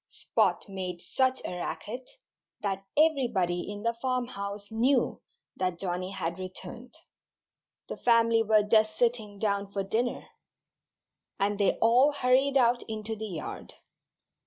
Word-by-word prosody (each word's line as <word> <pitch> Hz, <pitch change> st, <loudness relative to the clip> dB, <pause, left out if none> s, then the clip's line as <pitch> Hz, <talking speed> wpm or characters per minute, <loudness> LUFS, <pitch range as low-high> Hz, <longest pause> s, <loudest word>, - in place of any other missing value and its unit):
Spot -, -, 0 dB
made 185 Hz, -3 st, -5 dB
such 260 Hz, +7 st, 0 dB
a -, -, -4 dB
racket 245 Hz, +7 st, -5 dB, 0.5 s
that 195 Hz, -2 st, -2 dB
everybody 235 Hz, -, +2 dB
in 205 Hz, 0 st, -7 dB
the 230 Hz, 0 st, +1 dB
farmhouse 210 Hz, -6 st, -3 dB
knew 245 Hz, +3 st, +2 dB, 0.4 s
that 185 Hz, -2 st, -1 dB
Johnnie 180 Hz, 0 st, -2 dB
had 170 Hz, -2 st, -4 dB
returned. 230 Hz, +8 st, -8 dB, 0.9 s
The -, -, -6 dB
family 230 Hz, -1 st, +4 dB
were 215 Hz, -1 st, +4 dB
just 215 Hz, 0 st, +3 dB
sitting 225 Hz, -4 st, 0 dB
down 200 Hz, -1 st, -1 dB
for 200 Hz, -1 st, -2 dB
dinner. 230 Hz, +5 st, -1 dB, 1.1 s
And 205 Hz, +1 st, 0 dB
they 200 Hz, -, +4 dB
all 250 Hz, +6 st, +5 dB
hurried 270 Hz, +1 st, +3 dB
out 240 Hz, -1 st, +3 dB
into 220 Hz, 0 st, -3 dB
the 220 Hz, 0 st, -5 dB
yard. 165 Hz, -5 st, -7 dB
215 Hz, 130 wpm, -29 LUFS, 195-245 Hz, 1.1 s, all